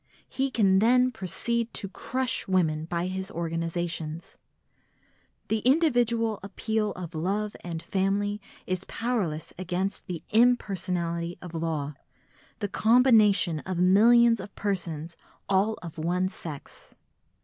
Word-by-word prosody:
He 270 +1 -1
can 195 -6 +3
then 250 +4 +4
proceed 235 +3 -2
to 200 - -1
crush 255 +6 -2
women 160 -5 +1
by 170 +1 -2
his 190 0 -4
organisations. 165 -1 -4 1.1
The 220 - +1
individual 240 -5 +2
appeal 210 +2 -2
of 180 -2 -7
love 200 +6 -2
and 165 -2 -5
family 200 +3 0 0.2
is 185 0 -2
powerless 200 -11 -2
against 185 +2 -2
the 175 -3 -5
impersonality 185 -7 +1
of 175 -1 -10
law, 160 -3 -2 0.7
the 205 - 0
combination 215 -6 +4
of 185 +3 -4
millions 230 +6 +5
of 190 +2 -9
persons 170 -5 -3 0.3
all 200 +3 +2
of 165 -2 -8
one 180 +3 0
sex. 160 -6 -10
190 Hz, 115 wpm, -27 LUFS, 170-220 Hz, 1.1 s, millions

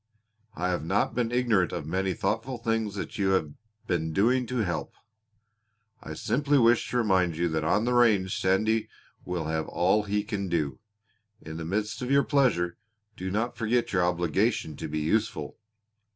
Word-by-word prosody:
I 90 +2 -1
have 90 -4 -1
not 95 +5 0
been 120 -1 -1
ignorant 120 -7 +2
of 80 -4 -4
many 95 +3 -1
thoughtful 115 +4 -2
things 115 -3 -1
that 100 - -6
you 95 -1 +2
have 80 -6 0 0.3
been 80 -3 -1
doing 120 +6 +2
to 125 -2 -1
help. 85 - -4 1.1
I 80 - -7
simply 140 - +1
wish 120 -2 +4
to 125 - -1
remind 95 -7 +2
you 85 +1 +1
that 80 -1 -1
on 105 +8 +2
the 125 - +1
range 105 -6 +3
Sandy 110 +4 +1 0.4
will 90 -3 -3
have 80 0 -2
all 95 +5 +2
he 105 0 -1
can 100 -3 -3
do. 75 -6 -1 0.6
In 80 -5 -8
the 80 - -5
midst 105 +7 -2
of 125 - -3
your 140 0 +4
pleasure 105 - +1 0.4
do 95 -1 -4
not 110 +5 -1
forget 120 0 0
your 90 -2 +3
obligation 85 -3 0
to - - -5
be 75 +1 -4
useful. 80 -1 -1
95 Hz, 175 wpm, -27 LUFS, 85-115 Hz, 1.1 s, wish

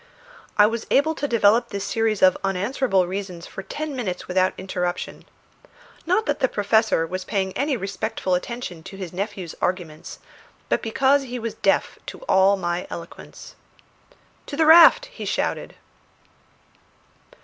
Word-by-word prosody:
I 205 - +7
was 225 +1 -2
able 315 +3 +3
to 290 -2 -3
develop 230 -1 +3
this 200 0 -4
series 220 -1 0
of 185 - +6
unanswerable 195 +1 +1
reasons 185 -2 -6
for - - -8
ten 300 +7 -5
minutes 190 -8 -4
without 185 0 +1
interruption; 180 -1 -4 0.8
not 370 +5 +2
that 290 -2 -1
the 260 - +3
Professor 215 -5 +2
was 185 +3 -5
paying 190 -2 -2
any 280 0 0
respectful 200 -1 -3
attention 180 -2 -4
to 195 - -11
his 185 -3 -7
nephew's 190 -2 -5
arguments, 175 -3 -3 0.5
but - - +1
because 265 +5 +2
he 250 0 -5
was 230 -2 -4
deaf - - 0
to - - -7
all 195 - +3
my 175 -1 -3
eloquence. 170 +1 -10 0.9
"To 285 - -6
the 320 - +3
raft!" 330 +9 +8
he - - -10
shouted. - - -2
200 Hz, 145 wpm, -23 LUFS, 185-250 Hz, 0.9 s, raft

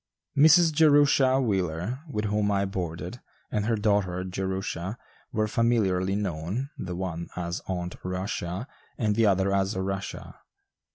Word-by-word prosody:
Mrs. 160 +3 +6
Jerusha 145 -4 +5
Wheeler, 95 -1 -1
with 105 -6 -2
whom 105 0 +1
I 100 -1 +1
boarded, 90 -4 -5 0.3
and 105 0 0
her 115 - +2
daughter 100 -4 +1
Jerusha 95 +1 -3 0.3
were 110 0 0
familiarly 105 -5 +1
known, 100 - -3
the 90 -1 -5
one 85 -2 -4
as 85 -1 -3
"Aunt 90 -1 -3
Rushia," 90 +2 -3 0.3
and 105 -3 +1
the 115 0 +4
other 95 0 +2
as 100 +1 +1
"Rushia." 95 +1 -4
100 Hz, 130 wpm, -27 LUFS, 90-115 Hz, 0.3 s, Mrs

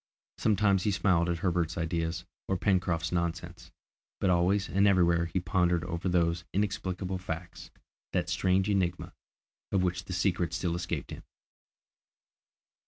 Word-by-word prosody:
Sometimes 100 -3 +3
he 105 - +1
smiled 90 -4 +2
at 85 - 0
Herbert's 85 -2 0
ideas 85 +1 -2 0.2
or 95 - 0
Pencroft's 90 -4 +1
nonsense, 85 0 -3 0.5
but 95 - +2
always 90 +3 +2
and 100 +2 +3
everywhere 85 -3 +4
he 95 - -1
pondered 90 -1 +1
over 85 +1 -3
those 85 -1 +1
inexplicable 95 -2 -2
facts, 85 -1 -6 0.4
that - - 0
strange 95 +1 +1
enigma, 95 -4 -1 0.6
of 95 -2 +2
which 90 0 -1
the 95 - -5
secret 90 -2 0
still 85 -2 -1
escaped 85 0 -4
him! - - -7
90 Hz, 135 wpm, -29 LUFS, 85-95 Hz, 0.6 s, everywhere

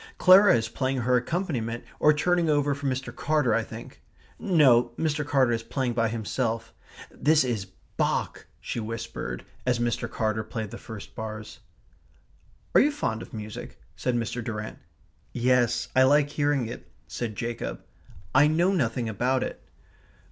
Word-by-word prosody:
Clara 190 -3 +7
is 115 -1 0
playing 130 +2 -1
her 125 +1 +3
accompaniment 125 -6 -2 0.2
or 150 - +6
turning 170 +2 +1
over 145 -1 +2
for 140 0 -4
Mr. 130 -2 -3
Carter, 150 -6 +1
I 115 - +2
think. - - -10 0.4
No, 125 -9 +4
Mr. 155 -2 0
Carter 135 -4 +2
is 115 -1 0
playing 125 +1 -2
by 115 -1 +1
himself 115 +1 -2 0.4
This 155 +1 +3
is 115 -6 -2 0.3
BACH," - - -1
she - - -4
whispered, 110 - -5 0.2
as 125 -1 +1
Mr. 120 -1 -1
Carter 110 0 -1
played 110 -1 -5
the 120 - -8
first 110 -3 -9
bars. 110 -3 -7 1.1
"Are - - +7
you 295 - +3
fond 115 - -2
of - - -10
music?" 105 -1 -8 0.2
said 125 -1 -1
Mr. 120 0 -2
Durrant. 105 -1 -5 0.5
"Yes. 125 -1 +2
I 130 - +6
like 145 +2 +4
hearing 145 -4 +1
it," 115 - -9 0.2
said 115 -3 -5
Jacob. 115 +1 -4 0.5
"I 145 - +6
know 170 +5 +2
nothing 120 -7 0
about 125 +5 0
it." - - -6
120 Hz, 155 wpm, -26 LUFS, 115-145 Hz, 1.1 s, Clara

